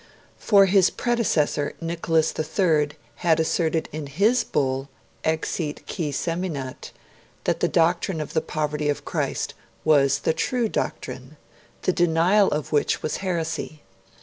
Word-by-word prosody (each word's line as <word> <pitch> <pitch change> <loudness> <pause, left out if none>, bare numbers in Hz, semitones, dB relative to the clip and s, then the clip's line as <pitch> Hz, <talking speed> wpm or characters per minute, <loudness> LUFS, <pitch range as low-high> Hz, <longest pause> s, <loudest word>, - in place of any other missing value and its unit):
For 200 -2 +5
his 190 -1 +4
predecessor, 165 -12 0
Nicholas 165 -1 0
III, 155 -2 +1 0.3
had 165 -2 +2
asserted 160 0 +1
in 150 -1 -5
his 210 - +2
bull 135 0 -1 0.3
'Exiit 160 -1 -2
qui 160 -6 -3
seminat' 160 -4 -3 0.5
that - - 0
the - - +2
doctrine 170 +1 +1
of 150 0 -5
the 160 - +2
poverty 150 -1 -2
of 145 - -2
Christ - - -2 0.3
was 140 -3 +4
the - - +1
true 245 - 0
doctrine, 135 -7 -4 0.5
the 185 - +2
denial 175 +4 +4
of 150 -1 -3
which 145 -2 +1
was 155 - -1
heresy. 165 -4 -3
160 Hz, 130 wpm, -24 LUFS, 150-180 Hz, 0.5 s, For